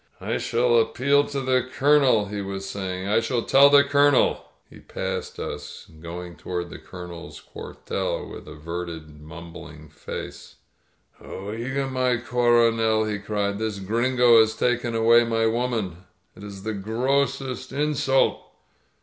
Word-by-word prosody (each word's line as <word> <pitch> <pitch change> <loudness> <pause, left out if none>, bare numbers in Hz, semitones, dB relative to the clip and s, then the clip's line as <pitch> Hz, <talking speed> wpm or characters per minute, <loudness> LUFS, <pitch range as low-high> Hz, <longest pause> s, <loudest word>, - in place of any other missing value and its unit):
"I - - -2
shall 120 0 +2
appeal 140 +5 +2
to 140 -1 -4
the 130 -1 +2
Colonel," 135 -6 +3
he 100 0 -5
was 95 0 -5
saying. 95 -1 -4
I 105 +2 +3
shall 115 +1 -1
tell 140 +1 +6
the 140 0 +7
Colonel!" 140 -1 +2 0.2
He - - -15
passed - - -5
us, - - -7
going 85 +1 -8
toward 85 -1 -5
the - - -9
Colonel's 85 -1 -10
cuartel, - - -5
with - - -10
averted, 80 0 -7
mumbling 80 -1 -11
face, 75 - -8 0.7
0%ga^ 115 +8 -4
mi 130 -2 +1
CoronelP* 115 -3 +2
he 105 - -3
cried. 100 -1 -2
This 110 -2 -2
Gringo 120 +4 +3
has 110 0 +3
taken 120 -1 0
away 115 +1 +5
my 115 -1 0
woman. 115 -6 -1 0.4
It - - -13
is 100 -2 -9
the 110 +1 -3
grossest 130 +5 -1
insult!" 140 -1 +1
115 Hz, 135 wpm, -24 LUFS, 95-130 Hz, 0.7 s, the